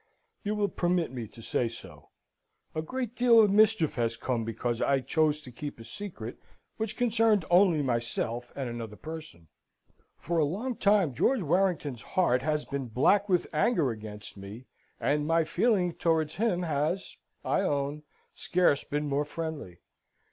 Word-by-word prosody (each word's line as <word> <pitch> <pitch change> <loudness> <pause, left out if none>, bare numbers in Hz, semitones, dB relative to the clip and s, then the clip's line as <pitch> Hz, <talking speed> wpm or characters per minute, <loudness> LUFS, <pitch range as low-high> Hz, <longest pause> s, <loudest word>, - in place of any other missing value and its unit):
"You 210 0 -1
will 205 -1 +1
permit 175 -4 0
me 120 -4 -5
to 115 +2 -14
say 120 - 0
so. 115 - -11 0.6
A 155 - -1
great 245 +7 -4
deal 240 -2 +6
of 210 -3 +6
mischief 210 -6 +4
has 115 -1 0
come 120 -1 -1
because 115 +1 -2
I 140 -1 +3
chose 150 +3 +1
to 130 - -11
keep 145 +2 -7
a - - -9
secret 120 - -7 0.4
which 220 -1 -3
concerned 225 -5 +3
only 175 -4 +5
myself 120 -1 -2
and 135 -2 -3
another 115 -3 -6
person. 155 - -9 0.7
For 170 +1 -1
a - - +4
long 215 - -2
time 200 -8 +3
George 250 - +2
Warrington's 165 - 0
heart 150 -10 +1
has 150 +1 -1
been 140 -2 -4
black 195 - +3
with 180 -2 +2
anger 160 - +2
against 105 -2 -9
me, 100 +6 -9 0.3
and 150 +1 +1
my 165 0 +3
feeling 180 +1 +1
towards 160 -2 0
him 195 -5 +1
has, 160 +4 -1 0.3
I - - +2
own, 145 -4 -1 0.3
scarce 175 -6 +2
been 150 +1 -2
more 145 +1 +1
friendly. 150 - -6
155 Hz, 160 wpm, -29 LUFS, 125-190 Hz, 0.7 s, deal